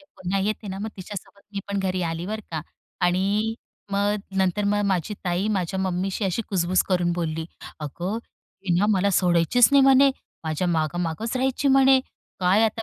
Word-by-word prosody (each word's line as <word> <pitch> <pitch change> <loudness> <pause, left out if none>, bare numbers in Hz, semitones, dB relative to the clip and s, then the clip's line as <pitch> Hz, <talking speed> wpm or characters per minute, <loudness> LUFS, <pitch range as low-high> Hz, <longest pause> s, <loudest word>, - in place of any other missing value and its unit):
ते - - -21
पुन्हा 185 +2 -2
येते 210 +1 -2
ना 190 0 -5
मग 215 +2 -3
तिच्यासोबत 200 +1 -9
मी 200 - -3
पण 200 0 -1
घरी 185 -1 -1
आली. 165 +1 -3
बरं 215 +2 -3
का. 160 -2 -2 0.4
आणि 195 +5 +1 0.4
मग 205 +1 +2 0.2
नंतर 190 +1 +1
मग 205 +1 +2
माझी 190 +1 0
ताई 180 +2 0
माझ्या 190 -1 -1
मम्मीशी 190 +2 -1
अशी 195 +4 0
कुजबुज 185 -1 +2
करून 180 -2 +2
बोलली, 165 -2 -2 0.4
"अगं 175 +7 -4 0.5
हि 180 -3 +1
ना 205 - +3
मला 200 -1 +2
सोडायचीच 180 +6 +4
नाही 280 -1 +7
म्हणे. 270 +1 +6 0.3
माझ्या 160 +3 -1
मागं 160 -1 0
मागंच 195 +9 -3
राहायची 265 +2 +1
म्हणे. 270 0 +6 0.4
काय 185 +4 +4
आता 225 0 -1
190 Hz, 180 wpm, -24 LUFS, 175-210 Hz, 0.5 s, नाही